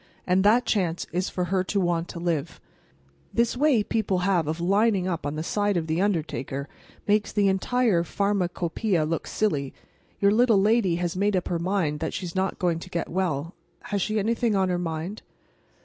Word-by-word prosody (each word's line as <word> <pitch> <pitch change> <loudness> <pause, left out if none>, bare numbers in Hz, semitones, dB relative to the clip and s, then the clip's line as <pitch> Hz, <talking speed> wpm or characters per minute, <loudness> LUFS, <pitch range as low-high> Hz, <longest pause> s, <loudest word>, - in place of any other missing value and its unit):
"And 185 +1 +2
that 230 +5 +4
chance 180 -7 0
is 180 +3 -1
for 180 - -2
her 185 +1 0
to 200 - 0
want 175 -2 0
to 170 - -7
live. 170 -5 -2 0.7
This 235 +1 +1
way 265 -5 +3
people 205 -4 0
have 180 -6 +2
of 160 +2 -2
lining 195 +1 +2
up 170 -5 -2
on 145 - -3
the 155 - -3
side 205 +2 0
of 165 - -1
the 160 +2 0
undertaker 150 -7 -2 0.4
makes 210 0 +2
the 205 -1 +2
entire 195 -1 +2
pharmacopeia 180 -1 0
look 165 +1 -2
silly. 145 -11 -1 0.4
Your 200 0 +4
little 225 -1 +4
lady 205 -3 +3
has 175 0 -2
made 200 +2 +1
up 180 - -1
her 170 - -1
mind 170 -4 0
that - - -3
she's 175 -3 -5
not 190 0 -1
going 170 -2 0
to 180 - -10
get 170 -2 -3
well. 165 -3 -2 0.4
Has 200 -1 0
she 215 +3 0
anything 225 +1 +1
on 190 -1 +2
her 180 -1 0
mind?" 170 +4 -4
185 Hz, 190 wpm, -25 LUFS, 170-205 Hz, 0.7 s, that